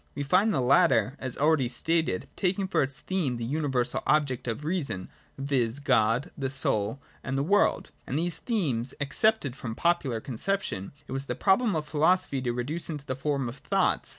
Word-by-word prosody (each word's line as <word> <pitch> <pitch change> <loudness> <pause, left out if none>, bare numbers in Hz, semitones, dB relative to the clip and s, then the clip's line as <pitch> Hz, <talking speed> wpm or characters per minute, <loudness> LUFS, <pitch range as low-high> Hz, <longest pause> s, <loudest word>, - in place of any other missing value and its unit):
We 145 - -2
find 190 +9 +3
the 135 - +1
latter, 130 - +4
as 130 -2 -5
already 150 -3 +3
stated, 160 - 0
taking 190 +1 0
for - - +1
its 135 +1 -2
theme 160 -11 -1
the 115 - -4
universal 135 -2 0
objects 140 -5 +1
of 115 +4 -3
the 150 - -6
reason, 135 - -2 0.3
viz. 135 -3 0
God, 130 +1 +2
the 135 -2 -2
Soul, 120 -3 0 0.2
and 135 +1 -2
the 135 - +1
World: 205 +6 +2 0.2
and 135 - -2
these 170 0 -1
themes, 135 - -1
accepted 145 - +1
from 115 -4 -6
popular 150 -9 +1
conception, 130 - -2 0.2
it - - -10
was 135 +1 -3
the - - -2
problem 205 +1 +3
of 155 -1 -2
philosophy 155 -2 +2
to 125 -2 -1
reduce 135 +9 -3
into 150 -3 -5
the 130 - -3
form 140 -1 -1
oi - - -3
thoughts. 135 - 0
140 Hz, 185 wpm, -28 LUFS, 125-165 Hz, 0.3 s, latter